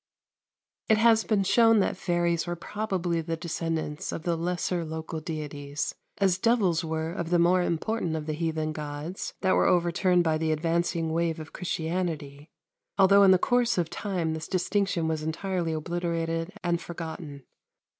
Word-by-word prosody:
112. -, -, -32 dB
It 220 Hz, -, +1 dB
has 225 Hz, -1 st, +5 dB
been 210 Hz, -3 st, +2 dB
shown 225 Hz, +3 st, +5 dB
that 195 Hz, -, +1 dB
fairies 175 Hz, -1 st, 0 dB
were 175 Hz, -, -2 dB
probably 180 Hz, -3 st, -2 dB
the 165 Hz, 0 st, -3 dB
descendants 160 Hz, -2 st, -3 dB
of 160 Hz, -, -5 dB
the 170 Hz, -1 st, 0 dB
lesser 175 Hz, +1 st, -1 dB
local 160 Hz, 0 st, -5 dB
deities, 150 Hz, -2 st, -4 dB, 0.2 s
as 190 Hz, -2 st, +2 dB
devils 195 Hz, -7 st, +2 dB
were 160 Hz, 0 st, -2 dB
of 170 Hz, -2 st, -4 dB
the 175 Hz, -, +3 dB
more 175 Hz, +2 st, +4 dB
important 175 Hz, 0 st, -1 dB
of 155 Hz, -1 st, -4 dB
the 155 Hz, -, -2 dB
heathen 155 Hz, -1 st, -2 dB
gods 150 Hz, +4 st, -5 dB
that 190 Hz, -1 st, +3 dB
were -, -, +3 dB
overturned 175 Hz, +1 st, +3 dB
by 160 Hz, -2 st, +1 dB
the 160 Hz, 0 st, 0 dB
advancing 165 Hz, +1 st, 0 dB
wave 165 Hz, 0 st, 0 dB
of 155 Hz, 0 st, -9 dB
Christianity, 160 Hz, -4 st, -3 dB, 0.5 s
although 195 Hz, +1 st, +6 dB
in 195 Hz, -, +7 dB
the 185 Hz, -, +7 dB
course 245 Hz, +2 st, +2 dB
of 170 Hz, -2 st, 0 dB
time 175 Hz, -4 st, -2 dB
this 160 Hz, 0 st, -5 dB
distinction 185 Hz, -2 st, 0 dB
was 160 Hz, -1 st, -1 dB
entirely 170 Hz, +2 st, -2 dB
obliterated 165 Hz, +1 st, -2 dB
and 175 Hz, -1 st, 0 dB
forgotten. 160 Hz, -4 st, -7 dB
170 Hz, 165 wpm, -27 LUFS, 160-185 Hz, 0.5 s, in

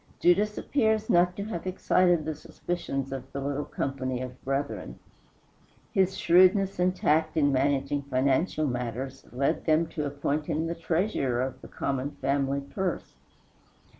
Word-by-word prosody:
Judas 205 Hz, +4 st, +3 dB
appears 220 Hz, -5 st, +1 dB
not 175 Hz, +1 st, +4 dB
to 200 Hz, -, -4 dB
have 190 Hz, -4 st, -5 dB
excited 180 Hz, -3 st, +2 dB
the 155 Hz, -, -2 dB
suspicions 145 Hz, -3 st, -4 dB
of 135 Hz, 0 st, -6 dB
the 140 Hz, -, -4 dB
little 140 Hz, +1 st, -2 dB
company 130 Hz, -2 st, -3 dB
of 130 Hz, 0 st, -7 dB
brethren. 135 Hz, +1 st, -3 dB, 1.0 s
His 190 Hz, -2 st, +2 dB
shrewdness 185 Hz, +2 st, +4 dB
and 180 Hz, +1 st, +2 dB
tact 160 Hz, -1 st, +1 dB
in 145 Hz, -2 st, +4 dB
managing 140 Hz, +1 st, +1 dB
financial 140 Hz, +5 st, +1 dB
matters 125 Hz, +1 st, -4 dB
led 135 Hz, +3 st, 0 dB
them 160 Hz, +1 st, +3 dB
to 150 Hz, -3 st, -3 dB
appoint 145 Hz, +1 st, -2 dB
him 160 Hz, +2 st, 0 dB
the 165 Hz, -, -2 dB
treasurer 160 Hz, -, 0 dB
of 130 Hz, 0 st, -5 dB
the -, -, -10 dB
common 135 Hz, +1 st, -3 dB
family 140 Hz, 0 st, 0 dB
purse. 180 Hz, +5 st, -4 dB
145 Hz, 145 wpm, -28 LUFS, 135-175 Hz, 1.0 s, not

